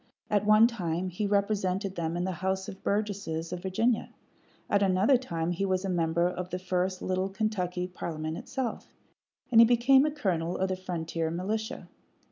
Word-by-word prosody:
At 205 0 +2
one 215 +1 +7
time 185 -6 -1
he 190 +4 -2
represented 200 -1 0
them 170 -1 -2
in 175 - -1
the 190 - -1
House 190 +2 -2
of 190 - -9
Burgesses 200 -6 -2
of 180 - -5
Virginia; 220 +5 0 0.6
at 200 - +2
another 195 +7 +4
time 170 -9 -2
he 175 +3 -2
was 190 0 0
a - - -2
member 170 -1 +1
of 180 0 -4
the 180 - -3
first 185 0 -1
little 185 +1 0
Kentucky 190 -4 -2
parliament 160 -3 -5
itself; 255 +6 -5 0.6
and 230 -1 +8
he - - +9
became 245 +3 +5
a 305 - +2
colonel 180 - -1
of 190 0 0
the 185 - 0
frontier 165 -3 -3
militia. 215 +8 -3
185 Hz, 175 wpm, -29 LUFS, 175-210 Hz, 0.6 s, he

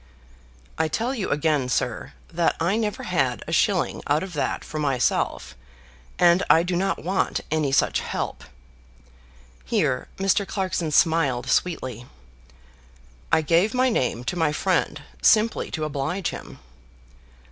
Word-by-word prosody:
"I 160 - +2
tell 230 - -1
you 220 -8 -3
again, 145 -3 +1
sir, - - -2 0.2
that 170 0 +1
I 170 +5 +1
never 215 -2 -2
had 135 - 0
a - - -5
shilling - - +1
out 150 +4 +2
of 190 -2 -7
that 150 - -2
for 155 - -5
myself, 135 -4 0 0.6
and 175 +1 +5 0.2
do 180 0 -1
not 195 +2 -1
want 185 +3 0
any 155 -3 +1
such 135 - +2
help." - - -4 1.2
Here 65 0 0
Mr. 195 +1 +1
Clarkson 185 -4 -2
smiled 145 -5 +2
sweetly. 130 -9 -1 1.2
"I 160 - +4
gave 175 - +2
my 255 +1 +3
name 125 - -1
to 130 - -3
my 160 -3 +1
friend 150 - 0 0.2
simply 220 0 +3
to 155 - -4
oblige 155 +6 -2
him." - - -9
165 Hz, 135 wpm, -24 LUFS, 140-190 Hz, 1.2 s, and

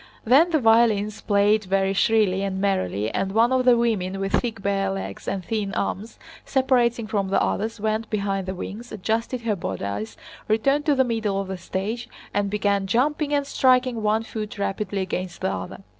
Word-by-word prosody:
Then 275 +9 +5
the 320 -3 +2
violins 225 -3 +3
played 205 +1 +2
very 195 +1 +1
shrilly 200 -2 +2
and 195 -1 -2
merrily 185 - 0
and 195 0 -2
one 230 +3 +4
of 260 -1 +2
the 245 -2 +6
women 195 -5 0
with 195 0 -2
thick 230 -4 0
bare 195 -1 0
legs 195 0 -5
and 190 -2 -3
thin 205 0 -2
arms, 205 +3 -3 0.3
separating 245 -4 +2
from 205 -2 -1
the 195 - +2
others, 220 +2 -1
went 220 +1 -1
behind 195 -2 -2
the 190 - -3
wings, 225 +6 -7
adjusted 225 +4 -2
her 225 -3 0
bodice, 100 - -4 0.3
returned 275 +7 +1
to 295 - +4
the 265 - +4
middle 220 -5 -1
of 195 -1 -4
the 190 - -4
stage, 210 +7 -4 0.2
and 205 -1 0
began 200 -1 0
jumping 290 +7 +1
and 285 -1 +1
striking 255 -3 +2
one 215 +1 +1
foot 215 -1 -6
rapidly 200 0 -2
against 185 -1 -5
the 190 - 0
other. 185 - -7
210 Hz, 185 wpm, -24 LUFS, 195-235 Hz, 0.3 s, the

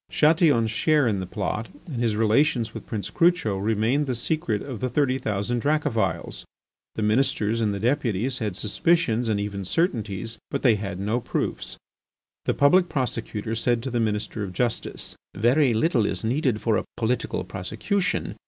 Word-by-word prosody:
Chatillon's 150 - +3
share 150 +5 +3
in 105 -4 0
the 95 - -4
plot 105 +3 -3 0.2
and 135 -9 -4
his 115 -3 +1
relations 115 +1 +2
with - - -8
Prince 105 -5 -4
Crucho 170 - +2
remained 115 +8 +1
the 130 - -1
secret 120 -4 -1
of 130 -6 -6
the 130 - -1
thirty 130 0 +1
thousand 105 +3 -1
Dracophils. 115 - -1 0.5
The 110 - -2
Ministers 115 -1 +1
and 105 -2 +1
the 100 - -3
Deputies 125 0 0
had 105 -5 -2
suspicions 120 - +1
and 105 -2 +1
even 100 -1 -3
certainties, 115 - -1
but 140 - -3
they 120 -4 +6
had 100 -3 -4
no 105 +5 0
proofs. - - -3 0.7
The - - +1
Public 175 +5 +4
Prosecutor 115 -5 -2
said 115 +1 +1
to 130 - -3
the 120 - 0
Minister 110 -1 -1
of 95 -2 -5
justice: 120 +4 -3 0.2
"Very 125 +6 +3
little 115 -2 +2
is 95 -3 -3
needed 125 -1 0
for 110 -2 +2
a - - -3
political 115 -4 -1
prosecution! 110 - -2
115 Hz, 165 wpm, -25 LUFS, 105-135 Hz, 0.7 s, they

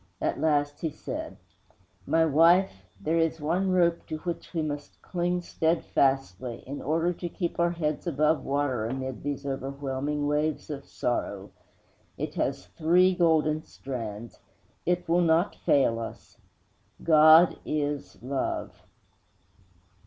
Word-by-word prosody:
At - - -1
last 145 -2 +1
he 160 - 0
said, - - -6 0.7
"My 165 0 +3
wife, 160 - +3
there 165 +2 0
is 165 0 +1
one 175 +6 0
rope 170 -2 +2
to 155 - -4
which 170 +1 -5
we 165 -3 -1
must 145 -1 -5
cling 175 0 -1
steadfastly, 135 - 0
in 140 +2 -6
order 165 +4 +1
to 175 0 -5
keep 170 0 -4
our 170 0 +3
heads 160 -1 -2
above 155 0 +2
water 135 -5 -1
amid 130 +1 -4
these 140 -1 -4
overwhelming 140 +1 -3
waves 150 +1 -1
of 140 -1 -7
sorrow. 100 -5 -3 0.7
It - - -4
has - - -2
three 170 - +3
golden 160 -3 +2
strands. 115 -7 -7 0.5
It 180 0 0
will 170 +2 +3
not 165 +2 +2
fail 125 -5 +2
us. 115 - -9 0.6
GOD 160 +2 +7
IS 145 -1 -3
LOVE." 135 +1 -2
155 Hz, 130 wpm, -27 LUFS, 135-170 Hz, 0.7 s, GOD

